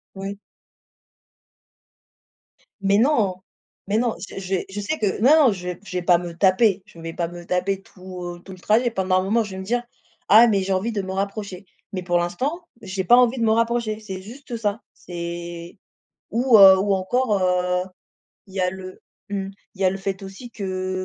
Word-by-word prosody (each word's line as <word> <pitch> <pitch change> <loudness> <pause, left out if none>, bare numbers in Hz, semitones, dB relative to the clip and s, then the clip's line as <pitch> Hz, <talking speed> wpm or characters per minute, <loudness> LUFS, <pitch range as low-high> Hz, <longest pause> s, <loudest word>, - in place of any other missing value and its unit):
Oui. 195 +1 -6 2.4
Mais, 195 +1 +3
non! 225 -6 +2 0.5
Mais, 205 - +1
non. 235 0 0
Je - - -7
j'ai 190 -1 -2
je 195 +2 -6
sais 205 +10 -2
que 205 -3 0
non, 280 +1 +6
je 180 -2 -5
vais 180 - -6
je 185 - -5
vais - - -1
pas 175 -1 +5
me 175 0 -6
taper. 195 +1 +3
Je 170 - -16
vais 165 0 -6
pas 170 0 -2
me 175 +1 -10
taper 185 +2 -1
tout, 185 -2 -10
heu, - - -18
tout 190 - -11
le 185 - -13
trajet. 225 +6 +2
Pendant 185 -3 +1
un - - -1
moment, 220 +4 +1
je 210 - -8
vais 190 - -7
me 190 - -5
dire: 240 +5 -1 0.5
«Ah 220 +4 +8
mais 200 -4 +2
j'ai 190 +1 -1
envie 195 +5 -1
de 210 -3 -2
me 190 0 -6
rapprocher». 200 0 -4 0.3
Mais, 185 -1 -3
pour 175 -1 +1
l'instant, 270 - -3
j'ai 190 -1 -3
pas 240 +7 +6
envie 250 0 +4
de - - 0
me 220 - +3
rapprocher. 230 -1 0
C'est 190 -4 -7
juste 240 +5 -9
ça. 215 -1 -2
C'est 170 +1 -7 0.5
ou, 240 +1 +4
heu 190 -1 +9
ou 200 +1 +1
encore, 210 +4 +1
heu, 180 0 +1 0.6
il 190 - -16
y 195 - -1
a 180 0 +2
le 185 0 -9 0.3
mmh, 195 -1 -3 0.2
il 195 - -15
y - - +2
a 185 - +5
le 195 - -3
fait 195 0 -4
aussi 195 +6 -9
que, 185 -3 -3
195 Hz, 205 wpm, -23 LUFS, 185-220 Hz, 2.4 s, heu